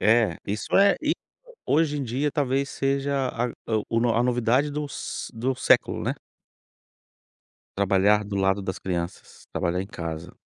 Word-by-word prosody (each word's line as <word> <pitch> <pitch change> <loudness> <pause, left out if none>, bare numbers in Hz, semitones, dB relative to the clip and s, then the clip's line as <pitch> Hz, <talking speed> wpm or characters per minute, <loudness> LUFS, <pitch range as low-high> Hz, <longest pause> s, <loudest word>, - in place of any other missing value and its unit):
É, 115 +1 +4
isso 105 +2 -1
é 200 0 +6
e 310 - +2 0.5
hoje 150 0 +2
em 135 - -2
dia 135 +5 -1
talvez 140 -2 0
seja 135 -1 0
a 120 +1 -1 0.4
o 115 - +2
o 120 -1 +2
a 120 - +3
novidade 125 +3 +2
dos 145 0 -5
do 130 +4 -1
século, - - +3
né. - - -1 1.6
Trabalhar 100 +2 +3
do 100 0 -4
lado 95 +1 +2
das 95 -1 -4
crianças, 90 -1 -5
trabalhar 90 +2 0
em 95 - -4
casa. 85 -3 -6
120 Hz, 150 wpm, -25 LUFS, 100-140 Hz, 1.6 s, é